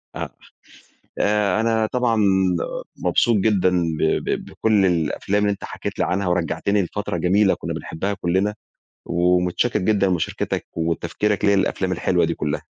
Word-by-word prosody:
آه، - - -4 0.9
آآ، 105 -1 +2
أنا 115 -1 +1
طبعًا 125 -2 +1 0.8
مبسوط 120 -2 +2
جدًا 100 -3 +2 0.3
ب - - -3 0.2
ب - - -2
بكل 105 -3 +1
الأفلام 90 +4 0
اللي 105 - +2
أنت 100 - -8
حكيت - - -6
لي - - +2
عنها، 95 +1 -1
ورجّعتني 90 +3 0
لفترة 100 0 -3
جميلة 95 +4 +3
كنا - - -5
بنحبها 100 +5 -3
كلّنا، 95 +3 0 0.5
ومتشكر 90 +6 +1
جدًا 100 0 +2
مشاركتك 90 -3 -2
وتفكيرك 85 +5 -1
ليا 100 0 +4
للأفلام 95 -1 0
الحلوة 90 -1 +1
دي 85 - -1
كلّها. 75 -2 -3
95 Hz, 140 wpm, -22 LUFS, 90-105 Hz, 0.9 s, ليا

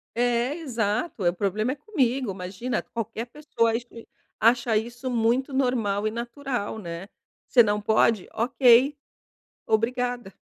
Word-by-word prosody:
É, 245 +3 +1
exato, 235 - -2
é, 175 - +4
problema 210 +6 -1
é - - -9
comigo, 265 - 0
imagina 190 +7 -3
qualquer 225 0 -5
pessoa 240 -4 0
acha 225 - +1 0.2
is 230 - -10 0.4
acha 235 0 +4
isso 240 +4 -4
muito 240 +4 +1
normal 225 -6 +1
e - - -1
natural, 240 -1 -4
né. 170 -1 -7 0.4
"Você 245 - +6
não 210 -2 +2
pode? 220 -2 +2
Ok! 250 +3 +4 0.7
Obrigada!". 240 -1 0
235 Hz, 130 wpm, -25 LUFS, 215-255 Hz, 0.7 s, Você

